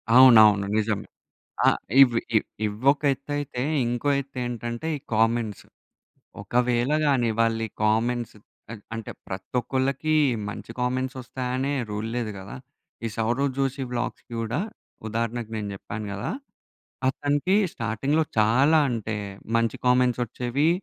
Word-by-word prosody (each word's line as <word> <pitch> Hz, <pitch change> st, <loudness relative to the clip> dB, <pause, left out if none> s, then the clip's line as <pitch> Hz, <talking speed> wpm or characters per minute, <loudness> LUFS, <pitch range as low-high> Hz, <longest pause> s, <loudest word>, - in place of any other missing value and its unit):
అవునవును 110 Hz, -6 st, +8 dB
నిజమే. 105 Hz, -2 st, -1 dB, 0.6 s
ఆహ్, -, -, +4 dB, 0.2 s
ఇవి 120 Hz, -4 st, +6 dB, 0.5 s
ఇవ్వొక 130 Hz, +9 st, +2 dB
ఎత్తైతే 145 Hz, -2 st, -4 dB, 0.2 s
ఇంకో 120 Hz, +4 st, -1 dB
ఎత్తు 140 Hz, -1 st, -9 dB
ఏంటంటే, 120 Hz, +3 st, -4 dB
ఈ -, -, -9 dB
కామెంట్స్. 115 Hz, -1 st, +1 dB, 0.8 s
ఒకవేళ 120 Hz, +4 st, +1 dB
గాని 130 Hz, -5 st, +3 dB
వాళ్లి 115 Hz, 0 st, +2 dB, 0.2 s
కామెంట్స్ 115 Hz, +2 st, +1 dB, 0.6 s
అంటే 115 Hz, -1 st, -5 dB, 0.2 s
ప్రతి 95 Hz, +4 st, -7 dB
ఒక్కళ్ళకి 135 Hz, +5 st, -1 dB, 0.4 s
మంచి 110 Hz, -, -7 dB
కామెంట్స్ 130 Hz, +2 st, -1 dB
వస్తాయనే 130 Hz, +2 st, -2 dB, 0.2 s
రూల్ 105 Hz, +2 st, -3 dB
లేదు 115 Hz, -3 st, -2 dB
కదా! 95 Hz, +7 st, -9 dB, 0.5 s
ఈ -, -, +1 dB
సౌరవ్ 120 Hz, +5 st, +1 dB
జోషి 135 Hz, 0 st, -1 dB
వ్లాగ్స్‌కి 120 Hz, 0 st, -4 dB
కూడా 115 Hz, +6 st, -2 dB, 0.5 s
ఉదాహరణకు 115 Hz, +1 st, -2 dB
నేను 105 Hz, -1 st, -4 dB
చెప్పాను 105 Hz, +2 st, -6 dB
కదా! 100 Hz, -, -4 dB, 0.8 s
అతనికి 145 Hz, +7 st, +1 dB, 0.2 s
స్టార్టింగ్‌లో 135 Hz, +7 st, 0 dB
చాలా 130 Hz, +9 st, +5 dB
అంటే 110 Hz, -2 st, -3 dB, 0.4 s
మంచి 115 Hz, -1 st, +1 dB
కామెంట్స్ 125 Hz, 0 st, +3 dB
వచ్చేవి 125 Hz, +6 st, 0 dB
120 Hz, 115 wpm, -25 LUFS, 110-130 Hz, 0.8 s, అవునవును